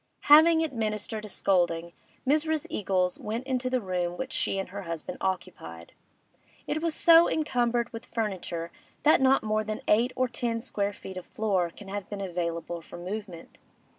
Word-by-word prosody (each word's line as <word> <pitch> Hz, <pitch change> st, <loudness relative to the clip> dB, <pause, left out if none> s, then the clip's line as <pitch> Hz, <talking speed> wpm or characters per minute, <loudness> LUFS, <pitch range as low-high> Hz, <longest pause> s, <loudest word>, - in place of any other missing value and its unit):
Having 320 Hz, +1 st, +7 dB
administered 215 Hz, -5 st, -2 dB
a -, -, -8 dB
scolding, 170 Hz, -3 st, +1 dB, 0.3 s
Mrs. 310 Hz, +2 st, +1 dB
Eagles 185 Hz, -3 st, 0 dB
went 225 Hz, +4 st, -4 dB
into 255 Hz, -1 st, -1 dB
the 255 Hz, 0 st, +1 dB
room 180 Hz, -2 st, -2 dB
which 260 Hz, 0 st, -4 dB
she -, -, +1 dB
and 195 Hz, -, -3 dB
her 200 Hz, +2 st, -6 dB
husband 165 Hz, -4 st, -5 dB
occupied. 125 Hz, -, -4 dB, 0.7 s
It 310 Hz, +1 st, -2 dB
was 330 Hz, -2 st, 0 dB
so 335 Hz, 0 st, +7 dB
encumbered 240 Hz, -6 st, 0 dB
with 230 Hz, -, -8 dB
furniture 180 Hz, -6 st, -3 dB, 0.3 s
that 300 Hz, -2 st, +5 dB
not 265 Hz, +1 st, +4 dB
more 215 Hz, 0 st, 0 dB
than 215 Hz, 0 st, -4 dB
eight 235 Hz, +4 st, +3 dB
or 255 Hz, 0 st, +1 dB
ten 235 Hz, -2 st, -1 dB
square 205 Hz, -4 st, -1 dB
feet 190 Hz, -1 st, -9 dB
of 185 Hz, -, -7 dB
floor 195 Hz, -5 st, 0 dB
can 195 Hz, +4 st, -13 dB
have 200 Hz, -1 st, -5 dB
been 205 Hz, -, -5 dB
available 170 Hz, -2 st, -3 dB
for 165 Hz, -, -11 dB
movement. 185 Hz, -1 st, -7 dB
210 Hz, 165 wpm, -28 LUFS, 180-255 Hz, 0.7 s, Having